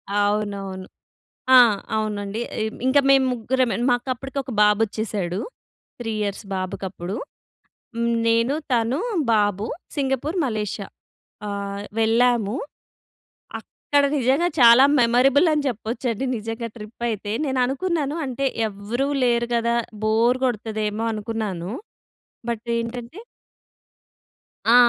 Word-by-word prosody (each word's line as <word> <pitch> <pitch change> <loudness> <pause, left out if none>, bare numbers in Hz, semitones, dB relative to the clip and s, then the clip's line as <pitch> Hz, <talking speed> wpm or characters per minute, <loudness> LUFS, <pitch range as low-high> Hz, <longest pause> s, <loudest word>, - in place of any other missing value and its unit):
అవునవును. 205 -2 -1 0.7
ఆ! - - +11 0.4
అవునండి. 210 0 -2 0.2
ఆహ్, 220 0 -2
ఇంకా 285 +2 +5
మేము 270 -1 +5
ముగ్గురమే. 250 +1 0
మాకు 245 +1 0
అప్పటికి 270 +2 -7
ఒక 260 - -8
బాబు 210 +1 +4
వచ్చేసాడు. 200 -4 -3 0.6
3 225 -2 -3
ఇయర్స్ 200 +1 -3
బాబుకప్పుడు. 185 0 -4 0.8
హ్మ్, 235 0 0
నేను, 230 +3 +3 0.2
తను, 240 +5 +1 0.3
బాబు 205 -1 +1 0.3
సింగపూర్, 280 +5 -1
మలేషియా. 210 -4 -3 0.6
ఆ! - - -3 0.5
వెళ్ళాము. 230 -1 +2 1.0
అక్కడ 285 -1 -1
నిజంగా 270 +7 +2
చాలా 235 +2 +8 0.2
మెమొరబుల్ 260 +7 +4
అని 300 -1 0
జెప్పొచ్చండి. 235 +1 -2
నిజంగా 225 +2 -4
ట్రిప్ 220 +1 -10
అయితే 205 -1 -3
నేను 265 -2 -1
అనుకున్నాను 295 +1 -1
అంటే 265 +1 -2 0.2
ఎవ్వరు 210 +7 -3 0.2
లేరు 235 -1 +2
గదా! 235 0 +1 0.3
బోర్ 230 +4 +3
కొడతదేమో 215 -2 -2
అనుకున్నాను. 210 -4 -4 0.8
బట్ 235 0 -3
ఏంటంటే 235 - -5 1.5
ఆ! - - +8
230 Hz, 105 wpm, -23 LUFS, 210-255 Hz, 1.5 s, ఆ